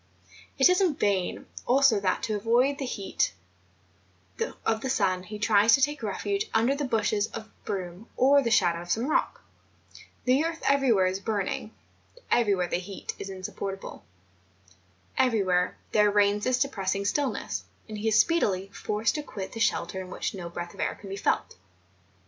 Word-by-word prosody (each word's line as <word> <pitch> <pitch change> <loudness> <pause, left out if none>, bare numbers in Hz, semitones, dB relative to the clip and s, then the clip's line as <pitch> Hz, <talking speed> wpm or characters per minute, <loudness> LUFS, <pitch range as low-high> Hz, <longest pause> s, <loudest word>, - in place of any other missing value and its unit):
It - - +7
is 365 +2 +3
in 350 -6 +2
vain 195 -6 0 0.2
also 260 -4 +5
that 195 -2 0
to 220 - -1
avoid 240 +6 +2
the 270 - -3
heat 200 -5 -1 1.3
of 225 0 +1
the 265 - -3
sun, 185 -8 +1
he 210 +3 -8
tries 210 +1 +5
to 270 - -2
take 295 -1 0
refuge 395 - -2
under 230 +4 +3
the 285 +1 -2
bushes 215 -3 +1
of 220 -1 -9
broom 185 +2 -5
or 280 +2 +5
the 240 - -1
shadow 175 -6 +3
of 175 - -11
some 225 +7 +1
rock; 305 - 0 0.8
the 260 +4 +3
earth 330 0 -3
everywhere 260 -9 +4
is 185 +1 -1
burning, 205 0 -2 0.6
everywhere 200 -6 +3
the - - -1
heat 185 +2 -6
is 195 - -6
insupportable, 195 +1 -6 1.2
everywhere 195 -8 +2
there 210 -1 +4
reigns 205 0 +2
this 255 -1 +2
depressing 200 -7 -1
stillness, 280 +6 -1 0.2
and 215 -1 -6
he 220 - -2
is 220 0 +4
speedily 195 - +2
forced 210 +2 -1
to 300 - -2
quit 200 -10 -7
the 225 - -7
shelter 190 -3 0
in 185 - -9
which - - -3
no 175 -3 -6
breath 175 0 -6
of - - -16
air - - -1
can 200 - -11
be 195 - -4
felt. 195 - -1
210 Hz, 170 wpm, -27 LUFS, 195-255 Hz, 1.3 s, It